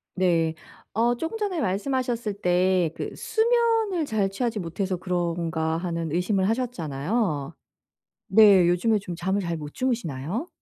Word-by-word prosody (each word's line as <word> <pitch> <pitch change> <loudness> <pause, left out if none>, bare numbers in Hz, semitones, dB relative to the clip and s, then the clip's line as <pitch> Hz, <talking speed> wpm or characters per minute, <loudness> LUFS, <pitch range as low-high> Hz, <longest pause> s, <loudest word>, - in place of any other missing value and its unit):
네. 170 -3 +2 0.4
어 240 +2 +3
쪼끔 325 - -4
전에 390 -7 -2
말씀하셨을 230 0 -1
때 180 -1 +2
그 - - -5
'수면을 450 -6 +1
잘 210 -6 0
취하지 225 +1 -2
못해서 185 +2 -2
그런가?' 170 -3 -1
하는 170 -3 -3
의심을 190 +3 +1
하셨잖아요. 175 - -1 0.8
네 195 -3 +7
요즘에 210 +5 +2
좀 180 -3 -6
잠을 190 +3 0
잘 170 -3 -2
못 150 -1 -7
주무시나요? 225 - -2
190 Hz, 285 characters per minute, -25 LUFS, 170-240 Hz, 0.8 s, 네